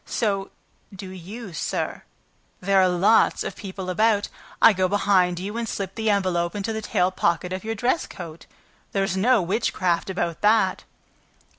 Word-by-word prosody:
So 200 -3 -1 0.4
do 190 -1 -9
you, 190 +3 -9
sir... 155 - -3 0.6
There 195 +1 +3
are 185 - +4
lots 195 +5 +3
of - - -5
people 190 -2 -7
about... 205 +3 +2 0.3
I 225 - +7
go 185 -1 +1
behind 185 -3 +2
you 205 +5 -5
and 230 -2 -3
slip 195 -1 -4
the 220 -1 -1
envelope 185 -4 0
into 205 +2 -2
the 220 - -3
tail 190 -4 +1
pocket 180 0 0
of 185 - -5
your 225 +1 -3
dress 245 +9 0
coat... 165 -2 -10 0.5
There's 195 -2 0
no 220 +2 +3
witchcraft 185 -2 0
about 170 -4 -2
that!" 210 -3 +2
195 Hz, 160 wpm, -24 LUFS, 180-210 Hz, 0.6 s, I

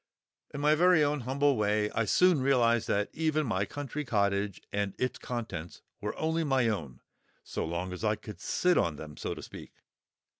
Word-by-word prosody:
In 145 - -5
my 150 +1 +4
own 155 - +4
very 180 -3 +6
humble 140 0 +1
way 105 -1 +1
I 115 - 0
soon 180 - +4
realised 120 -4 +3
that 100 0 0
even 155 -1 0
my 100 -4 0
country 145 +4 -5
cottage 100 -4 0
and 100 -1 -1
its 125 - -2
contents 105 -9 -6 0.2
were - - -4
only 160 +1 0
my 135 -5 +2
own 80 - -4 0.4
so - - -4
long 85 +3 -3
as 90 - -7
I 110 0 +2
could 105 0 -10
sit 180 0 +2
on 85 -3 0
them, 75 0 -9
so - - -4
to - - -9
speak. - - -10
115 Hz, 185 wpm, -30 LUFS, 100-145 Hz, 0.4 s, very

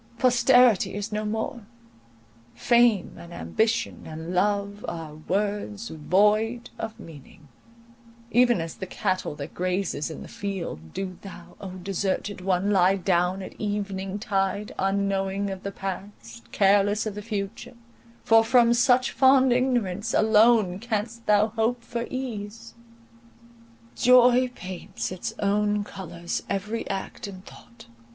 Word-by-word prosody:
Posterity 245 -4 +4
is 205 +2 -4
no 215 0 -2
more; 220 +1 -4 0.9
fame, 235 -5 +3
and 170 - -11
ambition, 225 +6 -1
and 160 +2 -6
love, 200 +2 0
are 160 -2 -6
words 205 +6 -3
void 210 +9 +1
of 225 0 -5
meaning; 150 -4 -14 0.8
even 240 -4 +4
as 165 0 -5
the 190 - -7
cattle 185 -5 -2
that 145 0 -7
grazes 180 -4 -2
in 160 - -8
the - - -10
field, 170 - -6
do 185 -2 -5
thou, 175 -3 -11
O 195 - -6
deserted 190 +1 -3
one, 190 +2 +1
lie 190 -1 +4
down 185 0 0
at - - -9
evening 200 -2 -3
tide, 200 0 -1
unknowing 195 0 0
of 190 -1 -6
the 200 - -5
past, 175 - -8
careless 205 +1 +3
of 215 - -3
the 210 - -6
future, 210 +2 -5 0.5
for 225 0 +5
from 235 0 +4
such 250 +1 +3
fond 265 -1 +5
ignorance 230 -5 0
alone 215 -3 +4
canst 230 +1 -4
thou 210 +1 +4
hope 235 +2 -1
for 235 0 -4
ease! 230 -3 -6 1.2
Joy 250 0 +5
paints 185 0 -6
with 185 - -7
its - - -4
own 205 +1 +1
colours 175 -4 -5
every 210 +3 -3
act 195 +1 -5
and 190 -1 -10
thought. 235 - -15
205 Hz, 130 wpm, -25 LUFS, 185-225 Hz, 1.2 s, for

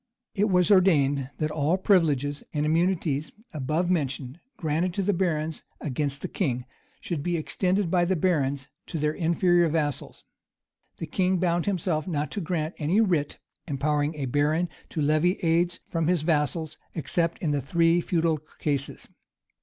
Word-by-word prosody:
It 210 +1 +1
was 180 +1 +3
ordained 145 -8 +4
that 155 0 -1
all 155 +1 +1
the 190 0 -1
privileges 145 -7 +2
and 150 0 +1
immunities 160 -2 +1 0.2
above 155 +5 0
mentioned, 135 -3 -2 0.2
granted 165 +3 -1
to 195 - 0
the 205 +2 +2
barons 160 -4 -1 0.2
against 140 0 -2
the - - -1
king, 125 -9 -2 0.3
should 165 -5 -3
be 175 +3 -1
extended 185 +3 0
by 175 -1 +3
the 185 +2 +1
barons 145 -6 0 0.2
to 165 - -4
their 150 0 0
inferior 175 0 +3
vassals. 150 -3 -2 0.7
The - - -4
king 185 +4 +1
bound 175 0 0
himself 175 -5 0
not 150 -4 -2
to 205 - -3
grant 160 -1 -2
any 165 +7 +2
writ, 170 -10 +1 0.3
empowering 145 +2 0
a 145 -3 -3
baron 150 +6 +1 0.2
to 155 - -2
levy 155 +4 +3
aids 170 +1 +2
from 165 -2 0
his 175 -3 +2
vassals, 155 0 0 0.2
except 170 +1 0
in 155 - -1
the 145 -1 0
three 165 +5 +3
feudal 165 -3 +1 0.2
cases. 140 -3 -2
160 Hz, 160 wpm, -26 LUFS, 150-175 Hz, 0.7 s, ordained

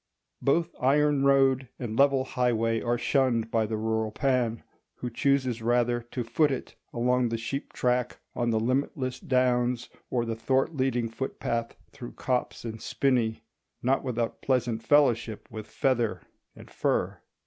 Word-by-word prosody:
Both 165 +5 +1
iron 140 +1 +3
road 135 -2 +3
and 115 -3 -4
level 135 0 +4
highway 115 -3 0
are 120 0 0
shunned 120 -3 +1
by 110 -2 +1
the 110 0 -2
rural 110 0 0
Pan, 125 -3 0 0.3
who 125 - -5
chooses 130 -2 +1
rather 120 +1 +2
to 120 +1 -5
foot 145 +6 +2
it 135 -3 -4 0.2
along 125 0 +1
the 115 - -1
sheep 135 +5 -4
track 125 0 0 0.2
on 120 -1 0
the 110 -1 +2
limitless 130 +2 -1
downs 125 -2 +1 0.2
or 120 -2 0
the 115 -1 -2
thwart 130 +7 0
leading 130 -3 0
footpath 115 -1 -3 0.2
through 120 -3 -9
copse 125 -2 -2
and 110 -1 -6
spinney, 120 -5 0 0.4
not 130 +2 +2
without 120 -3 -2
pleasant 120 -4 0
fellowship 120 -5 +2
with 110 -1 -7
feather 115 -9 0 0.3
and - - -14
fir. - - 0
125 Hz, 150 wpm, -27 LUFS, 115-135 Hz, 0.4 s, level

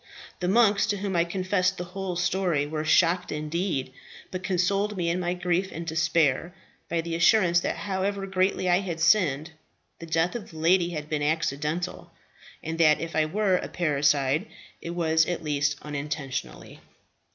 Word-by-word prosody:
The 180 - -1
monks, 210 0 +4
to 205 -2 0
whom 195 -1 -3
I 170 0 +3
confessed 185 +1 0
the 180 - -3
whole 185 0 -5
story, 175 -4 0
were 155 +1 -3
shocked 175 +3 +3
indeed, 150 -3 -2 0.4
but 185 - -4
consoled 195 +3 0
me 170 -2 0
in 175 - -1
my 175 0 -1
grief 180 +1 0
and 165 +1 -6
despair 160 0 +1 0.3
by 170 0 0
the 165 0 -5
assurance 175 0 +4
that - - -2
however 195 0 -2
greatly 190 -1 0
I 175 0 +4
had 175 -4 -4
sinned, 165 -4 +2 0.5
the 165 - -9
death 165 +2 +1
of 240 -4 -6
the 160 - -12
lady 170 +2 +3
had 150 -3 -5
been 155 -1 -2
accidental, 160 +3 -2 0.5
and 160 +1 -4
that 155 -2 +5
if 165 0 -5
I 155 0 +2
were 195 +2 +1
a - - -4
parricide 150 +1 +1 0.3
it 170 +1 -6
was 160 -2 +2
at 175 -2 -3
least 145 -1 0
unintentionally. 145 -2 -5
170 Hz, 170 wpm, -26 LUFS, 155-185 Hz, 0.5 s, that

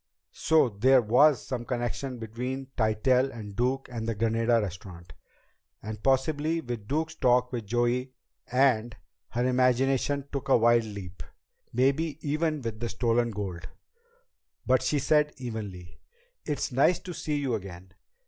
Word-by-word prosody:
So 160 -4 +3
there 125 +6 +4
was 125 +4 +4
some 125 -2 -4
connection 120 +2 -3
between 125 +4 -5
Tytell 125 +4 +2
and 105 -5 -9
Duke 130 +4 0
and 115 -2 -4
the 115 - -1
Granada 115 +2 +2
Restaurant 90 -4 -7 0.7
and 105 0 -6
possibly 145 +5 +1
with 120 -7 -6
Duke's 160 +4 -1
talk 125 -4 +2
with 115 -5 -4
Joey, 120 +3 0 0.4
and 120 -4 +2 0.3
her 120 +1 -1
imagination 130 +2 +1
took 140 -1 -4
a - - +6
wild 120 0 +4
leap 100 -4 -8 0.5
maybe 140 +5 +1
even 155 -1 0
with 115 -2 -4
the 120 0 -3
stolen 120 0 +1
gold! 95 -5 -5 1.0
But - - +3
she 150 - 0
said 150 +1 +2
evenly: 105 -8 -7 0.5
"It's 145 -2 -2
nice 140 +8 +3
to 180 - -8
see 155 -2 -3
you 140 -4 -1
again. 95 -3 -7
120 Hz, 140 wpm, -28 LUFS, 110-135 Hz, 1.0 s, a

